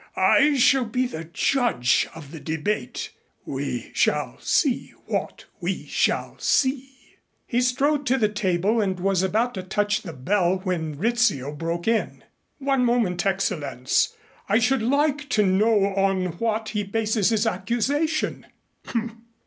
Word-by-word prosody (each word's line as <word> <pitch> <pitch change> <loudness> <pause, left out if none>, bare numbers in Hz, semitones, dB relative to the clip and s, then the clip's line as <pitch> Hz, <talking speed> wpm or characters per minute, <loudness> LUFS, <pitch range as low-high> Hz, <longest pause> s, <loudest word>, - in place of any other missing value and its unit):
I 290 0 +4
shall 265 0 +4
be 250 +3 0
the 165 -9 -6
judge 170 - +1
of 150 -3 -10
the 160 - -8
debate. 160 +7 -3 0.3
We - - -4
shall - - 0
see 275 -7 0
what - - -3
we - - -3
shall - - -1
see." 270 0 -1 0.3
He 245 0 0
strode 275 +3 +1
to 260 +2 +3
the 220 -4 +3
table 205 +1 0
and 190 -3 -1
was 190 0 +1
about 220 +6 +1
to 190 - -4
touch 205 +3 0
the 185 - -7
bell 180 +7 +1
when 160 -6 -2
Rizzio 215 - +1
broke 165 +4 -4
in. 225 -1 0 0.3
"One 270 -2 +1
moment, 225 -8 +1
Excellenz. 150 - 0 0.3
I 205 - +4
should 250 +2 +2
like 290 +4 +1
to 215 -4 +3
know 200 +1 +3
on 195 -1 +1
what 220 -1 -1
he 210 - -1
bases 215 0 0
his 220 -1 +1
accusation." 285 +8 -1
215 Hz, 140 wpm, -24 LUFS, 185-250 Hz, 0.3 s, I